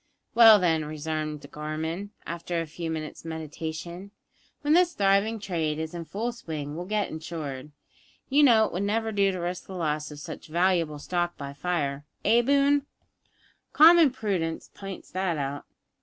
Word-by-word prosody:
"Well, 225 -2 +9
then," 165 -5 +2
resumed 155 0 -4
Gorman, 160 +6 -4 0.2
after 170 0 -3
a 165 - -2
few 165 +1 -6
minutes' 155 -1 -5
meditation, 160 +3 -6 0.5
"when 295 0 +2
this 350 +1 +4
thriving 200 +3 +2
trade 165 -6 -2
is 160 +1 -4
in 170 -1 -5
full 225 +8 -3
swing 155 -10 -6
we'll 175 +2 -5
get 210 0 0
it - - -11
insured. 155 -3 -6 0.6
You 285 +2 +4
know 230 -6 +6
it - - -4
would 180 - -2
never 220 +2 0
do 200 -2 +2
to 185 - -4
risk 175 +1 -4
the 190 - -8
loss 155 -3 -1
of 150 - -9
such 150 - -8
valuable 170 -2 +1
stock 175 +3 -2
by 140 -1 -6
fire 145 -3 -2 0.2
eh, 230 +3 +5
Boone? 280 +2 +3 0.9
common 330 -1 +8
prudence 195 -10 -3
pints 195 -2 -9
that 185 -3 -1
out! 140 0 -4
175 Hz, 165 wpm, -27 LUFS, 155-205 Hz, 0.9 s, Well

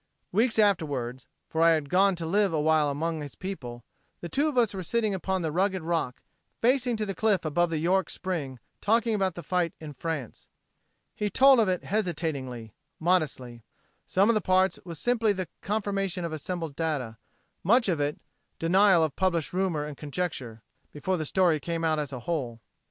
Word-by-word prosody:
Weeks 225 +4 +2
afterward 145 - +1 0.2
for 160 - -2
I 165 0 +6
had 155 -3 -1
gone 190 +4 +3
to 170 -1 -5
live 195 +2 +2
awhile 155 -1 +3
among 160 +3 -2
his 145 -2 -8
people 125 -11 -6 0.4
the 170 - -6
two 285 - +1
of 295 -4 -2
us 230 -4 +3
were 190 - -4
sitting 215 +3 0
upon 190 0 -1
the 160 - -1
rugged 190 +1 0
rock, 160 -6 -2 0.4
facing 245 -1 +2
to 215 - -1
the 195 - -3
cliff 195 -2 +1
above 175 +3 +1
the 165 - -1
York 180 +4 +1
spring, 155 -9 -4 0.2
talking 230 +2 +2
about 190 -4 0
the 175 - -7
fight 175 +1 0
in 155 -2 -8
France. 145 -3 -5 0.7
He 210 - -2
told 270 +3 +6
of 215 -4 +3
it 180 -1 -1
hesitatingly, 150 - -3 0.3
modestly. 150 -9 0 0.5
Some 195 +2 +3
of 230 - +4
the 215 - +1
parts 185 +1 +2
was 170 -3 -7
simply 230 +1 +2
the 185 -2 -4
confirmation 195 -3 -1
of 165 - -4
assembled 165 -1 -4
data; 140 -9 -2 0.5
much 235 +6 +4
of 170 -5 +1
it, 145 +1 -1 0.4
denial 185 +1 +4
of 155 -3 -1
published 175 -5 0
rumor 180 -5 0
and 150 -1 -7
conjecture 140 -7 -4 0.3
before 185 +5 -2
the 155 -2 -3
story 175 -3 +3
came 165 +2 -3
out 160 -1 +2
as 145 -3 -3
a 125 -3 -6
whole. 125 -6 -3
170 Hz, 185 wpm, -27 LUFS, 150-195 Hz, 0.7 s, I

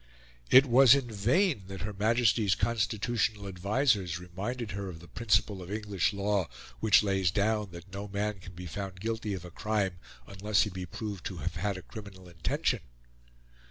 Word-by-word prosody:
It 130 +2 +8
was 130 0 +7
in 130 -4 -2
vain 115 - +2
that 95 -2 -7
Her 105 +2 -4
Majesty's 110 -1 +3
constitutional 110 -1 0
advisers 100 - +1
reminded 100 +6 -5
her 100 +1 -4
of 80 -3 -8
the 85 - -13
principle 105 -3 +1
of 90 +2 -8
English 105 -4 0
law 100 -2 0 0.3
which 105 -1 +5
lays 95 -3 +2
down 105 +2 +1
that 85 +2 -12
no 100 +1 -5
man 100 0 -2
can 90 0 -11
be 90 +1 -8
found 95 +2 -6
guilty 110 -1 -2
of 90 -1 -7
a 90 - -10
crime 100 -3 -1 0.3
unless 100 +4 +1
he 105 - -3
be 90 0 -6
proved 100 -1 -6
to - - -7
have - - -2
had 100 +2 -1
a 95 - -9
criminal 95 -2 -10
intention. 85 -3 -1
100 Hz, 175 wpm, -30 LUFS, 95-110 Hz, 0.3 s, It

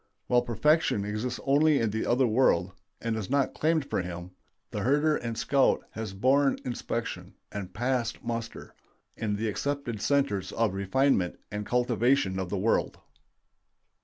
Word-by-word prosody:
While 125 0 +3
perfection 120 -2 +2
exists 110 +4 -3
only 145 +1 +4
in 115 -2 0
the 110 +1 -2
other 125 +2 +3
world, 110 -7 +3 0.3
and 115 -1 -2
is 110 -4 -4
not 140 0 +1
claimed 155 -2 +1
for - - -1
him, 90 0 -7 0.4
the - - -3
herder 150 +4 +2
and 115 -4 -4
scout 140 -2 +2
has 110 -3 -6
borne 135 +6 +3
inspection, 125 - -4 0.2
and 100 -3 -6
passed 120 +3 -1
muster, 115 -1 -5 0.4
in 105 -2 -2
the 110 +2 -2
accepted 125 -1 -3
centers 135 -10 +1
of 115 -4 +1
refinement 100 0 +1
and 105 0 -4
cultivation 120 -4 +2
of 95 -2 -3
the 100 - -2
world. 105 +5 +1
115 Hz, 150 wpm, -28 LUFS, 105-135 Hz, 0.4 s, only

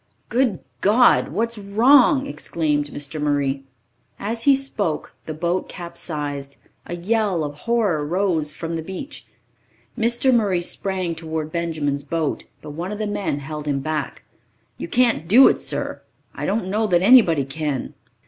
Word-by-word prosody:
"Good 240 -6 +1 0.3
God, 240 +3 +5
what's 230 +6 -2
wrong?" 255 +8 +4
exclaimed 150 - -1
Mr. 145 +1 -4
Murray. 140 -2 0 0.5
As 225 +3 -3
he 280 -1 +7
spoke, 220 - -2
the 155 - -3
boat 175 +3 -1
capsized. 145 -5 -5 0.3
A 175 - -4
yell 195 -1 0
of 145 -1 -4
horror 200 -2 0
rose 165 -2 +1
I - - -11
from 165 0 -4
the - - -3
beach. 190 - -8 0.7
Mr. 240 +3 +2
Murray 200 -7 +2
sprang 185 -1 -1
toward 160 -1 -4
Benjamin's 155 -4 -2
boat, 155 +1 -2 0.2
but 150 - -7
one 170 +6 -5
of 210 - -4
the 215 - -2
men 200 -8 -2
held 150 +1 -6
him 140 -1 0
back. 150 -1 -4 0.6
"You - - -4
can't 235 -4 +2
do 245 +9 +8
it, - - +2
sir. - - -4 0.3
I - - -4
don't 200 -1 -1
know 215 +3 0
that 175 -2 +2
anybody 190 - +6
can." 145 -1 -3
170 Hz, 155 wpm, -22 LUFS, 150-215 Hz, 0.7 s, do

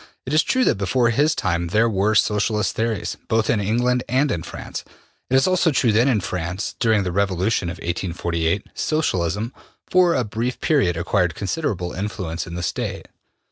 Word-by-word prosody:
It 130 - -3
is 155 - +6
true 255 +9 +1
that - - +2
before 115 +5 +2
his 145 +6 +2
time 85 -3 -1
there 110 +7 +3
were 105 0 +1
Socialist 105 0 +2
theories, 115 -1 -2
both 110 -1 +2
in 110 - +1
England 120 +5 +1
and 135 +3 +2
in 85 - -1
France. 85 - -7 0.5
It 130 - +2
is 135 - +5
also 185 -2 +3
true 125 -5 +2
that 115 +5 +3
in 115 -7 +2
France, 90 +3 -3
during 110 -4 +3
the 90 - -2
revolution 95 0 0
of 85 - -5
1848, 85 +1 -2
Socialism 110 - -1 0.3
for 180 -2 +4
a 130 - +1
brief 115 +3 -3
period 135 - +2
acquired 90 -1 0
considerable 95 - -2
influence 95 -4 -4
in 85 - -7
the 90 - -4
State. - - -3
105 Hz, 180 wpm, -22 LUFS, 90-125 Hz, 0.5 s, is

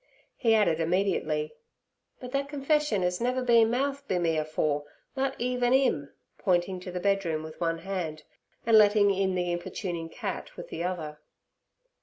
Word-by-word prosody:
He 225 -3 +3
added 170 -7 +3
immediately: 160 -3 0 0.7
'But 250 -1 -8
thet 275 +1 -1
confession 290 - +1
'as 180 +2 -1
never 255 +1 0
been 230 -2 +5
mouthed 280 +3 -1
be 185 - 0
me 165 -2 +1
afore, 155 -1 0 0.3
nut 270 0 -1
even't 250 0 +1
'im' 200 - +1 0.3
pointing 180 0 +1
to 180 0 -7
the 180 - -3
bedroom 180 -5 0
with 155 +1 -10
one 165 -1 +1
hand, 165 -4 -4 0.4
and 225 -1 +7
letting 205 -1 +5
in 190 -1 0
the 180 -1 0
importuning 175 -1 -4
cat - - -6
with - - -8
the 170 - -4
other. 160 -5 -4
190 Hz, 160 wpm, -28 LUFS, 165-240 Hz, 0.7 s, and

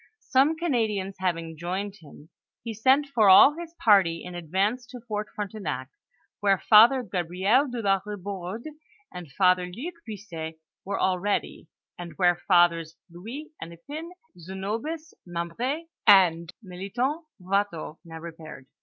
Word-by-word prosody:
Some 275 +4 +4
Canadians 220 - -1
having 165 -3 -2
joined 190 +5 -4
him, 155 -2 -16 0.3
he 230 -1 -5
sent 265 +6 +3
all 215 +5 +8
his 340 0 -9
party 195 - +3
in 180 - -8
advance 195 +9 -1
to 245 -1 -10
Fort 210 -1 -3
Frontenac, 185 -11 -4 0.5
where 200 -1 +3
Father 235 +7 +6
Gabriel 190 - +1
de 240 -2 -5
la 195 -1 +3
Kibourde, 200 +1 -6 0.5
and 175 -5 -9
Father 180 +2 +3
Luke 250 - -7
Buisset 175 -7 -7 0.3
were 195 +1 -3
al 185 -1 +1
ready, 205 -3 -2 0.3
and 170 -2 -7
where 175 +1 +2
Fathers 170 -3 +3 0.2
Louis 230 - -9
Hennepin, 285 - -8 0.3
Zenobius 215 - -5
Mem 170 -1 -5
br6, 265 - -2 0.2
and 170 -3 +5
Melithon 240 - -3 0.2
Watteau, 185 -4 -2
now 165 -2 -10
repaired. 160 -4 -10
195 Hz, 130 wpm, -26 LUFS, 175-230 Hz, 0.5 s, all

